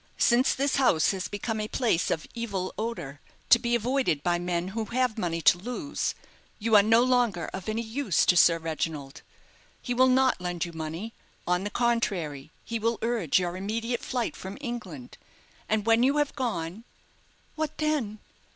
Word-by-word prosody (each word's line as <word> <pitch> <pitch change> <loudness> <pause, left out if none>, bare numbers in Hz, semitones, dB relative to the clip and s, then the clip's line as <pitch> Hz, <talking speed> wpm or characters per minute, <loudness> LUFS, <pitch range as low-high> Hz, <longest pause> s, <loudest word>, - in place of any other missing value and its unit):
Since 245 +2 +3
this 280 +1 +1
house 250 -12 +4
has 195 0 -3
become 215 +2 -3
a 215 - -3
place 220 -8 +1
of 155 - -1
evil 200 -6 -3
odour, 190 -11 -5 0.3
to 235 - +9
be 240 0 0
avoided 240 - 0
by 175 -1 +1
men 175 0 -2
who 220 +2 -3
have 250 0 0
money 170 -6 -2
to 175 - +6
lose, 250 - -3 0.4
you 225 0 +1
are 205 - +9
no 225 +3 +4
longer 240 -9 +1
of 190 +2 -5
any 225 +2 -1
use 225 - +1
to 180 - +4
Sir 170 -1 +6
Reginald. 160 -3 -4 0.6
He 245 - -3
will 255 +1 +5
not 260 -5 +3
lend 175 -1 -2
you 170 - -9
money. 165 +8 -5 0.3
On 180 +1 +1
the 205 - -2
contrary 190 - -1 0.2
he 230 -1 -3
will 230 +1 0
urge 225 -10 +1
your 175 -1 -1
immediate 225 +5 -2
flight 245 -3 -2
from 190 +2 -8
England; 215 - -7 0.5
and 215 -1 +1
when 230 0 +4
you 275 +4 +3
have 295 -1 0
gone 220 - -3 0.4
" - - -36
"What 310 -1 -3
then?" 295 -9 -1
220 Hz, 180 wpm, -27 LUFS, 175-240 Hz, 0.6 s, to